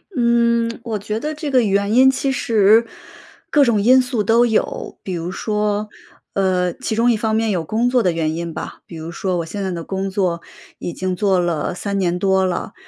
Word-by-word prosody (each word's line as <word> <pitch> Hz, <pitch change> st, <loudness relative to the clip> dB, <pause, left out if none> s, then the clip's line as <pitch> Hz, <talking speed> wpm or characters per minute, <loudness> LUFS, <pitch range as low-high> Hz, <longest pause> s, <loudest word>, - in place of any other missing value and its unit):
嗯， 235 Hz, -1 st, +2 dB
我 220 Hz, -3 st, -3 dB
觉 210 Hz, +2 st, -3 dB
得 300 Hz, +5 st, -3 dB
这 300 Hz, -1 st, -5 dB
个 255 Hz, -3 st, +3 dB
原 200 Hz, +1 st, +1 dB
因 260 Hz, +2 st, +6 dB
其 270 Hz, +1 st, -1 dB
实 225 Hz, -2 st, +3 dB, 0.6 s
各 290 Hz, -2 st, +4 dB
种 225 Hz, -5 st, +2 dB
因 255 Hz, +4 st, +6 dB
素 245 Hz, -4 st, -2 dB
都 230 Hz, +3 st, +4 dB
有。 220 Hz, -2 st, -2 dB
比 190 Hz, -, -4 dB
如 170 Hz, +1 st, -4 dB
说， 210 Hz, 0 st, -1 dB, 0.4 s
呃， 180 Hz, -2 st, +1 dB
其 220 Hz, -, -4 dB
中 235 Hz, +2 st, +3 dB
一 225 Hz, -, +1 dB
方 220 Hz, 0 st, 0 dB
面 225 Hz, 0 st, +1 dB
有 175 Hz, -5 st, -1 dB
工 225 Hz, +8 st, 0 dB
作 245 Hz, -2 st, +2 dB
的 180 Hz, -, +2 dB
原 160 Hz, -1 st, -1 dB
因 170 Hz, -1 st, -4 dB
吧， -, -, -7 dB
比 170 Hz, -, -11 dB
如 160 Hz, +1 st, -7 dB
说 180 Hz, +1 st, -2 dB
我 165 Hz, -, -2 dB
现 200 Hz, +4 st, -5 dB
在 190 Hz, -, -2 dB
的 170 Hz, -1 st, -5 dB
工 195 Hz, +2 st, -3 dB
作 180 Hz, -3 st, -1 dB, 0.4 s
已 175 Hz, -, -5 dB
经 185 Hz, -1 st, -2 dB
做 190 Hz, -1 st, +2 dB
了 175 Hz, -2 st, -1 dB
3 200 Hz, +2 st, -3 dB
年 180 Hz, -2 st, 0 dB
多 190 Hz, 0 st, +2 dB
了。 185 Hz, +3 st, -3 dB
205 Hz, 225 characters per minute, -19 LUFS, 180-230 Hz, 0.6 s, 因